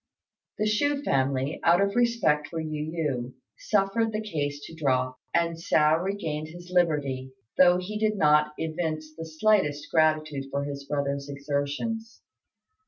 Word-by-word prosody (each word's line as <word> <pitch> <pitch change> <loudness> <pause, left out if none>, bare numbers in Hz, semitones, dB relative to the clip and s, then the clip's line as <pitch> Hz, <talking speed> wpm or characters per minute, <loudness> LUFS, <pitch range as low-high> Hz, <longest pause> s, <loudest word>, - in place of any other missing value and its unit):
The 215 - 0
Chou 285 +7 +1
family, 135 - 0
out 170 +1 +5
of 200 +1 +1
respect 235 -11 +2
for 165 - -5
Yu 155 -1 -4
yü, 135 -7 -2 0.3
suffered 210 +2 +1
the 215 - -2
case 145 -9 -3
to - - -10
drop, 130 -5 0
and 170 0 +1
Hsiao 155 -1 +3
regained 160 -6 -3
his 175 +2 -11
liberty, 145 -7 0 0.3
though 180 -1 +7
he 205 +4 -4
did 215 -1 +1
not 150 -2 +4
evince 155 -1 -3
the 165 0 -7
slightest 155 -4 +1
gratitude 155 -3 +2
for 140 +1 -2
his 140 -1 -6
brother's 140 -1 -2
exertions. 145 +11 -3
155 Hz, 145 wpm, -27 LUFS, 145-190 Hz, 0.3 s, though